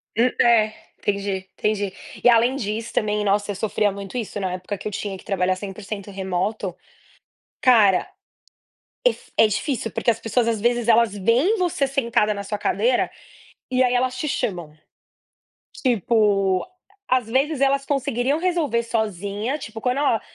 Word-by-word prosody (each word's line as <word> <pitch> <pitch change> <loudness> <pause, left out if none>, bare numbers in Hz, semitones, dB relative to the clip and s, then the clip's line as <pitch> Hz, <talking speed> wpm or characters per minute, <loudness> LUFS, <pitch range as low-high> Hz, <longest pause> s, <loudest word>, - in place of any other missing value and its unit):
Hum, 235 +3 +4
eh, 220 -2 +4 0.3
entendi, 200 -2 -2
entendi. 205 -2 -1 0.3
E - - +7
além 240 +2 +4
disso, 225 -2 -4
também, 210 0 0
nossa, 205 +1 +1
eu - - -5
sofria 205 +1 0
muito 200 +1 -8
isso 220 -3 -4
na 185 -2 -2
época 185 +3 -5
que - - -6
eu - - -4
tinha 200 -1 -4
que - - -16
trabalhar 185 -2 +1
100% 200 +1 -7
remoto. 190 0 -2 0.9
Cara, 215 -7 +5 1.0
é - - +8
f - - -16 0.2
difícil 225 +2 -2
porque - - 0
as 230 -1 +1
pessoas 230 +1 0
às 230 -2 0
vezes 240 0 +1
elas 230 -2 +4
veem 240 - +2
você 350 -6 +1
sentada 235 -6 +1
na 200 -1 -5
sua 210 +1 -3
cadeira, 225 +4 +1 0.6
e 255 0 +3
aí 250 -1 +2
elas 255 +1 +1
te 305 - -2
chamam. 175 - -3 1.1
Tipo, 205 - +2 0.4
às 255 -2 +2
vezes, 270 +4 +1
elas 275 0 +2
conseguiriam 275 0 0
resolver 330 -9 0
sozinha, 215 - -2
tipo, 225 -5 -8
quando 250 +3 0
ela 275 -6 +2
220 Hz, 155 wpm, -23 LUFS, 200-250 Hz, 1.1 s, é